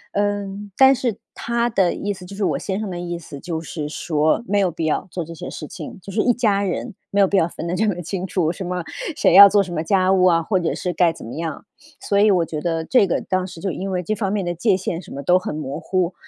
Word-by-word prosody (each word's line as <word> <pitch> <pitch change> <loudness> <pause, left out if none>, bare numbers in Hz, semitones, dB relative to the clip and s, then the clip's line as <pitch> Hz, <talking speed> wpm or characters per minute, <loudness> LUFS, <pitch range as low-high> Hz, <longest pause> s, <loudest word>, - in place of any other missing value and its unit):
嗯， 205 0 -2
但 265 0 +7
是 245 -5 -2 0.2
他 235 0 -1
的 190 -5 +2
意 205 0 -2
思， 185 -2 -12
就 195 +2 -9
是 205 - -2
我 - - 0
先 195 +1 -3
生 210 -4 -4
的 175 - -5
意 175 -1 -4
思， 145 -4 -10
就 165 +1 -4
是 150 -2 -5
说 155 +6 0
没 205 0 +2
有 190 - +2
必 165 -1 -4
要 155 - -1
做 170 0 -4
这 165 - -9
些 165 - -7
事 155 - -7
情， - - -9
就 200 - -8
是 215 - +2
一 245 - +3
家 215 -4 +1
人 200 +3 -3 0.2
没 200 - 0
有 195 - +6
必 200 - -1
要 165 -3 +4
分 170 - -7
得 170 - -2
这 215 +3 +1
么 180 -4 -1
清 185 +2 -4
楚， 175 -3 0
什 190 - -6
么 180 -1 -3 0.3
谁 285 - +3
要 200 +2 +11
做 205 0 +4
什 185 - -9
么 155 - -2
家 190 +1 +3
务 185 -1 +4
啊， 165 -2 +4
或 190 +1 +1
者 170 - -1
是 180 -1 -3
该 170 0 +3
怎 165 - -11
么 115 - -7
样。 160 -3 -5 0.3
所 200 - 0
以 210 +1 +5
我 180 -4 +3
觉 155 -2 -5
得 165 -2 -1
这 250 -6 +4
个， 175 - 0
当 185 0 -1
时 170 -2 -10
就 190 +1 -2
因 190 +3 -4
为 180 -1 -2
这 215 - -1
方 200 -2 -2
面 205 -3 -1
的 175 - -1
界 190 +3 +2
限 175 -2 -3
什 - - -15
么 140 +1 -6
都 180 +5 +4
很 150 - -5
模 145 -2 -4
糊， 185 -1 -1
185 Hz, 305 characters per minute, -21 LUFS, 170-200 Hz, 0.3 s, 要